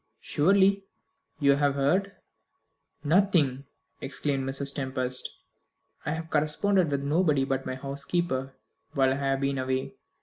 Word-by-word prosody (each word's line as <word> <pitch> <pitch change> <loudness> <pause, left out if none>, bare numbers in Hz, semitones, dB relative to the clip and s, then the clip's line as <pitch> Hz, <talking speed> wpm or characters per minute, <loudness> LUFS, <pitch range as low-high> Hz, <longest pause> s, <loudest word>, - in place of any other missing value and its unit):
"Surely 195 +4 +3 0.6
you 140 -2 +4
have 145 -1 +1
heard 180 +9 +1 0.5
" - - -47
"Nothing," 155 -9 +2 0.4
exclaimed 135 -1 -2
Mrs. 140 +1 -1
Tempest. 130 -2 0 0.8
"I 150 - 0
have 160 0 -6
corresponded 160 +4 +2
with 140 -1 -1
nobody 150 -2 +2
but 135 -1 -2
my 130 - -3
housekeeper 140 0 -3 0.4
while 135 -2 +3
I 135 - 0
have 135 -1 -1
been 140 -1 0
away. 130 0 -2
140 Hz, 130 wpm, -27 LUFS, 135-160 Hz, 0.8 s, you